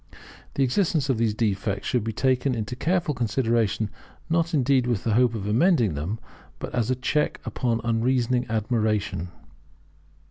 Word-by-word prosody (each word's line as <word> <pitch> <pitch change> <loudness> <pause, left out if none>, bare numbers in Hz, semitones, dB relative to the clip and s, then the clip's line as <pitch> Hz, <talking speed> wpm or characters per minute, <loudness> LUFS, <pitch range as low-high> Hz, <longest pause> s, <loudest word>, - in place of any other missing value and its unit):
The 135 - +2
existence 150 +1 +1
of 120 - -1
these 110 -2 +1
defects 100 -2 -1
should 125 -4 +1
be 115 - -2
taken 130 +2 +1
into 115 +2 -4
careful 170 +3 0
consideration; 115 -3 0 0.4
not 165 0 +2
indeed 135 -4 +2
with 120 -6 0
the 115 - +1
hope 120 0 +3
of 100 -3 -4
amending 115 - +3
them, 80 +10 -3 0.4
but - - -7
as 120 -1 0
a 130 - +2
check 150 +4 0
upon 115 -3 -1
unreasoning 120 +1 +1
admiration. 110 -5 0
120 Hz, 150 wpm, -25 LUFS, 110-130 Hz, 0.4 s, hope